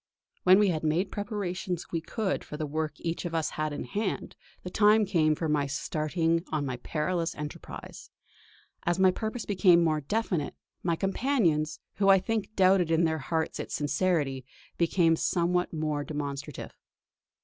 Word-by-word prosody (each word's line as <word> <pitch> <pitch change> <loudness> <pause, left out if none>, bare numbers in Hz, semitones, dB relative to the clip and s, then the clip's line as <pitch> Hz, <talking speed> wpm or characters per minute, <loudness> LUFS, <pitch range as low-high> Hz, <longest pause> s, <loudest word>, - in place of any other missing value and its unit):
When 185 +1 +8
we 205 -1 +4
had 160 -3 -1
made 160 +5 +2
what 195 - -23
preparations 190 -4 -3
we 165 - -1
could 200 +4 -2
for 150 - -7
the 155 - -2
work 155 +1 -2
each 165 0 -3
of 170 -2 -3
us 160 -2 0
had 155 0 -2
in 145 - -4
hand, 210 0 -3 0.3
the 180 - -6
time 210 +1 +5
came 160 -5 +2
for 160 - -2
my 150 -2 +1
starting 160 +4 0
on 150 -2 0
my 130 -2 -3
perilous 165 +6 -2
enterprise. 150 0 -8 0.7
As 175 0 0
my 190 -1 +5
purpose 220 +4 -4
became 180 -4 +5
more 155 -2 +1
definite, 180 -2 -1 0.3
my 170 -1 +1
companions, 190 - +1 0.2
who 195 -1 +3
I 195 - +8
think 215 +2 -2
doubted 185 -2 +4
in 165 +1 +3
their 160 -1 +1
hearts 160 +3 -2
its - - -4
sincerity, 145 -3 0 0.3
became 170 -1 +3
somewhat 180 +2 +1
more 155 -2 -2
demonstrative. 145 -1 -5
165 Hz, 165 wpm, -28 LUFS, 155-190 Hz, 0.7 s, When